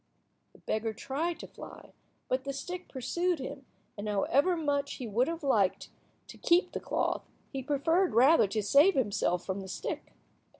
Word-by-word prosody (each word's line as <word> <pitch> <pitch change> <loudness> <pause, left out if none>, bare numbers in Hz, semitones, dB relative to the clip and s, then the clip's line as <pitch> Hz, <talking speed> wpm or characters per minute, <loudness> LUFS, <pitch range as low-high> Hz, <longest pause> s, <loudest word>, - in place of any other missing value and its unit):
The - - -18
beggar 220 0 -2
tried 315 +10 -3
to - - -8
fly, - - -12 0.3
but 260 +1 0
the 275 0 -4
stick 360 +6 -6
pursued 345 +7 -1
him, 270 0 -7 0.3
and 210 +1 -5
however 280 - +2
much 285 -3 -1
he 255 - -6
would 230 +4 +1
have 330 -1 -4
liked 210 -9 +1 0.4
to - - -11
keep 355 +1 +3
the - - -3
cloth, - - -1 0.3
he 270 - -2
preferred 320 - +1
rather 260 0 +6
to 215 +2 -2
save 290 - +5
himself 200 -7 0
from 190 +1 -3
the 190 - -8
stick. 185 - -5
275 Hz, 170 wpm, -30 LUFS, 220-330 Hz, 0.4 s, rather